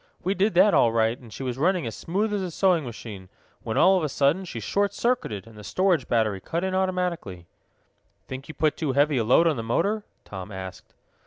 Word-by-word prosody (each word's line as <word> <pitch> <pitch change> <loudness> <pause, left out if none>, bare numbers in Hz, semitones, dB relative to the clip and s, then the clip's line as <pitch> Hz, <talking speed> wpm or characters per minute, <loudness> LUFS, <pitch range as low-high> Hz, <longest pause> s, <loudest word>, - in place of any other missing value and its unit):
We 190 +2 +1
did 200 0 +1
that 195 +3 +6
all 115 - +4
right, 115 0 +2
and 120 -4 -14
she 135 - -7
was 125 0 -3
running 180 +1 +2
as 115 - -5
smooth 205 +5 -1
as 205 - 0
a 185 - -3
sewing 175 -1 +2
machine, 105 -5 -9 0.3
when, 110 - -3
all 190 0 +6
of - - -4
a 155 - -1
sudden, 145 +8 +1
she 120 -10 -6
short 200 - 0
circuited, 230 - -1
and 115 -1 -15
the 105 - -11
storage 175 - +1
battery 110 -4 +1
cut 170 - -3
in 190 0 -1
automatically." 180 - -2 0.8
"Think 130 +1 -7
you 155 - -9
put 155 -1 +1
too 150 -5 -1
heavy 145 +1 +3
a 115 - +2
load 125 +9 +4
on 160 -5 +2
the 115 - -3
motor?" 200 - 0 0.2
Tom 95 0 -8
asked. 95 -1 -9
150 Hz, 225 wpm, -25 LUFS, 115-185 Hz, 0.8 s, that